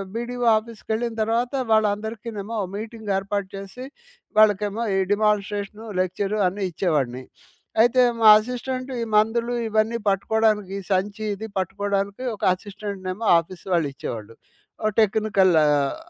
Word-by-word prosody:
BDO 240 Hz, +1 st, -3 dB
ఆఫీస్‌కెళ్ళిన 225 Hz, +1 st, -4 dB
తర్వాత 230 Hz, +4 st, 0 dB, 0.2 s
వాళ్ళందరికినేమో 220 Hz, 0 st, -1 dB, 0.2 s
meeting 220 Hz, 0 st, -5 dB
ఏర్పాటు 200 Hz, 0 st, -2 dB
చేసి 195 Hz, +6 st, -8 dB, 0.5 s
వాళ్ళకేమో 210 Hz, +1 st, +3 dB
ఈ -, -, +2 dB
డిమాన్‌స్ట్రేషను, 210 Hz, 0 st, -1 dB, 0.2 s
లెక్చరు 195 Hz, +3 st, -2 dB
అన్ని 195 Hz, +2 st, -2 dB
ఇచ్చేవాడిని. 145 Hz, -8 st, -1 dB, 0.6 s
అయితే 250 Hz, +2 st, +4 dB, 0.2 s
మా 220 Hz, -, +8 dB
అసిస్టెంట్ 255 Hz, +3 st, -4 dB
ఈ -, -, 0 dB
మందులు 230 Hz, +3 st, +1 dB, 0.2 s
ఇవన్నీ 220 Hz, +2 st, +1 dB
పట్టుకోడానికి 210 Hz, 0 st, +1 dB
సంచి 200 Hz, +3 st, -1 dB
ఇది 220 Hz, +3 st, -7 dB
పట్టుకోడానికి 200 Hz, +4 st, -2 dB
ఒక -, -, -13 dB
అసిస్టెంట్‌నేమో 200 Hz, +1 st, -6 dB
ఆఫీస్ 170 Hz, +2 st, -10 dB
వాళ్ళు 165 Hz, -4 st, +2 dB
ఇచ్చేవాళ్ళు. 115 Hz, -3 st, -7 dB, 0.5 s
ఒక 215 Hz, -, +2 dB
టెక్నికల్ 210 Hz, -3 st, +3 dB
ఆహ్, 145 Hz, -2 st, +2 dB
210 Hz, 115 wpm, -23 LUFS, 195-225 Hz, 0.6 s, మా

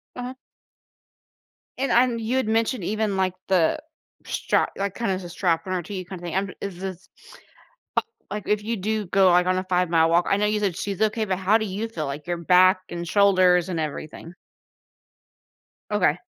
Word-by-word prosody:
Uh-huh. 250 Hz, +1 st, -5 dB, 1.4 s
And 265 Hz, -1 st, -1 dB
I'm 240 Hz, -1 st, +3 dB
you 235 Hz, +4 st, -1 dB
had 260 Hz, -, 0 dB
mentioned, 225 Hz, -1 st, 0 dB
even, 210 Hz, 0 st, -1 dB
like, 185 Hz, -1 st, +1 dB
the 185 Hz, -, +2 dB, 0.5 s
strap -, -, 0 dB
like, 200 Hz, -1 st, -2 dB
kinda 230 Hz, -5 st, -1 dB
has 185 Hz, 0 st, -4 dB
a 175 Hz, -, -8 dB
strap, 170 Hz, -1 st, 0 dB
an 185 Hz, -, -3 dB
RT 175 Hz, -1 st, -3 dB, 0.2 s
kinda 185 Hz, 0 st, -8 dB
thing. 175 Hz, 0 st, -4 dB
I'm 195 Hz, 0 st, 0 dB
is 190 Hz, -3 st, -5 dB
this 190 Hz, -1 st, -7 dB, 1.2 s
a -, -, -3 dB
like, 210 Hz, -, -5 dB
if 210 Hz, 0 st, +1 dB
you 230 Hz, +2 st, -2 dB
do 210 Hz, +1 st, -2 dB
go, 195 Hz, +1 st, +3 dB
like, 180 Hz, +1 st, +4 dB
on 185 Hz, 0 st, +2 dB
a 185 Hz, -, -2 dB
five-mile 175 Hz, -3 st, +2 dB
walk 175 Hz, +1 st, +3 dB
I -, -, +3 dB
know 210 Hz, +1 st, +1 dB
you 210 Hz, 0 st, 0 dB
said 190 Hz, -5 st, -1 dB
she's 200 Hz, +1 st, -3 dB
okay, 220 Hz, +1 st, +1 dB
but 190 Hz, -2 st, -1 dB
how 200 Hz, +4 st, +3 dB
do 220 Hz, -, -2 dB
you 205 Hz, +4 st, -3 dB
feel? 155 Hz, -10 st, -4 dB
Like, 145 Hz, +4 st, -6 dB
your 175 Hz, -, 0 dB
back, 185 Hz, +2 st, +5 dB
and 170 Hz, 0 st, -5 dB
shoulders, 185 Hz, -2 st, +4 dB
and 170 Hz, -3 st, -2 dB
everything. 155 Hz, +3 st, -6 dB, 1.6 s
Okay. -, -, +2 dB
190 Hz, 190 wpm, -24 LUFS, 175-210 Hz, 1.6 s, back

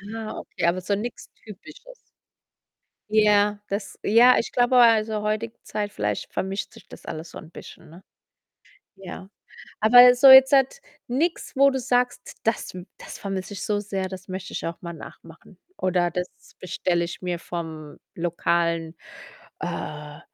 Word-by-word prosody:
Ah, 220 Hz, -1 st, -6 dB
okay, -, -, -5 dB
aber 175 Hz, +2 st, +1 dB
so 200 Hz, +2 st, -1 dB
nix 230 Hz, +4 st, -6 dB, 0.2 s
Typisches. -, -, -13 dB, 1.1 s
Ja, 210 Hz, -1 st, +3 dB
das 200 Hz, 0 st, -5 dB
ja, 240 Hz, +4 st, +6 dB
ich -, -, -2 dB
glaube, 245 Hz, +1 st, +2 dB
also, 220 Hz, -3 st, +4 dB
heutige 215 Hz, +2 st, -3 dB
Zeit 205 Hz, -1 st, -4 dB
vielleicht 105 Hz, -, -3 dB
vermischt 195 Hz, +1 st, -4 dB
sich -, -, -17 dB
das -, -, -14 dB
alles 160 Hz, +1 st, -7 dB
so -, -, -9 dB
'n 160 Hz, -, -12 dB
bisschen, -, -, -13 dB
ne? 170 Hz, +4 st, -15 dB, 0.9 s
Ja. 190 Hz, 0 st, -10 dB, 0.5 s
Aber 245 Hz, +3 st, +8 dB
so 260 Hz, +3 st, +5 dB
jetzt 265 Hz, +1 st, +9 dB, 0.5 s
nix, 320 Hz, +9 st, -2 dB
wo 275 Hz, +1 st, +5 dB
du 265 Hz, -1 st, -2 dB
sagst: 250 Hz, 0 st, -1 dB
„Das 225 Hz, -1 st, -1 dB, 0.3 s
das -, -, -10 dB
vermisse 195 Hz, 0 st, -5 dB
ich 195 Hz, -, -6 dB
so 210 Hz, -1 st, -1 dB
sehr, 195 Hz, -2 st, -4 dB
das 185 Hz, 0 st, -10 dB
möchte 185 Hz, 0 st, -7 dB
ich -, -, -4 dB
auch 165 Hz, 0 st, -6 dB
mal 170 Hz, -1 st, -7 dB
nachmachen 165 Hz, +3 st, -14 dB, 0.2 s
oder 180 Hz, -2 st, 0 dB
das 180 Hz, +2 st, -3 dB, 0.3 s
bestelle 175 Hz, -1 st, -1 dB
ich 170 Hz, -, -7 dB
mir 180 Hz, -2 st, -3 dB
vom 160 Hz, -4 st, -7 dB, 0.2 s
lokalen, 170 Hz, -1 st, -1 dB, 0.6 s
äh, 150 Hz, 0 st, -6 dB
200 Hz, 150 wpm, -24 LUFS, 170-230 Hz, 1.1 s, jetzt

